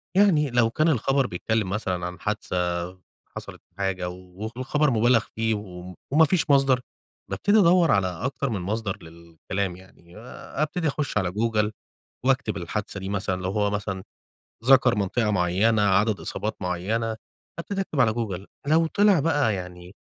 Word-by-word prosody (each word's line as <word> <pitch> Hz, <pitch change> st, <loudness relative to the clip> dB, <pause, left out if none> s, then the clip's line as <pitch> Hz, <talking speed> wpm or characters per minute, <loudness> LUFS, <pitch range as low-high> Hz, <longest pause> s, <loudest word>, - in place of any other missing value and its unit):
يعني 175 Hz, -8 st, +4 dB
لو 120 Hz, -2 st, +3 dB
كان 155 Hz, +8 st, +2 dB
الخبر 135 Hz, 0 st, +2 dB
بيتكلِّم 105 Hz, +3 st, -1 dB
مثلًا 95 Hz, -3 st, -2 dB
عن 90 Hz, +1 st, -6 dB
حادثة 90 Hz, -2 st, -2 dB, 0.4 s
حصلت -, -, -8 dB, 0.2 s
حاجة 95 Hz, -2 st, -1 dB
و 90 Hz, +4 st, -8 dB
والخبر 145 Hz, +4 st, +1 dB
مُبالغ 115 Hz, 0 st, +3 dB
فيه 115 Hz, 0 st, +1 dB
و 90 Hz, -3 st, -8 dB, 0.2 s
وما 160 Hz, +3 st, +6 dB
فيش 160 Hz, -1 st, 0 dB
مصدر، 135 Hz, -3 st, +4 dB, 0.5 s
بابتدي 200 Hz, -, +3 dB
أدوَّر 170 Hz, -3 st, +5 dB
على 100 Hz, -2 st, +3 dB
أكتر 125 Hz, -, -3 dB
من 105 Hz, -5 st, -2 dB
مصدر 100 Hz, +1 st, -2 dB
للكلام، 85 Hz, +3 st, -5 dB
يعني 90 Hz, 0 st, -17 dB
أبتدي 150 Hz, +7 st, -3 dB
أخُشّ 140 Hz, -5 st, -2 dB
على 90 Hz, -3 st, 0 dB
جوجل، 105 Hz, 0 st, 0 dB, 0.5 s
وأكتب 130 Hz, -5 st, +1 dB
الحادثة 100 Hz, +3 st, -4 dB
دي 95 Hz, -, -5 dB
مثلًا 95 Hz, -2 st, -2 dB
لو 95 Hz, -, -1 dB
هو 105 Hz, 0 st, +1 dB
مثلًا 100 Hz, -2 st, -3 dB, 0.6 s
ذَكَر 130 Hz, -1 st, +6 dB
منطقة 105 Hz, +2 st, 0 dB
معيّنة، 100 Hz, +4 st, +2 dB
عدد 105 Hz, +1 st, +2 dB
إصابات 110 Hz, -, -3 dB
معيّنة، 110 Hz, +6 st, -1 dB, 0.4 s
حتى 170 Hz, +4 st, -4 dB
تكتب 190 Hz, -8 st, -2 dB
على 110 Hz, -4 st, +4 dB
جوجل، 100 Hz, -5 st, -4 dB, 0.2 s
لو 160 Hz, +3 st, +4 dB
طلع 200 Hz, -1 st, +4 dB
بقى 145 Hz, -8 st, +2 dB
يعني 90 Hz, 0 st, -8 dB
105 Hz, 150 wpm, -25 LUFS, 95-135 Hz, 0.6 s, وما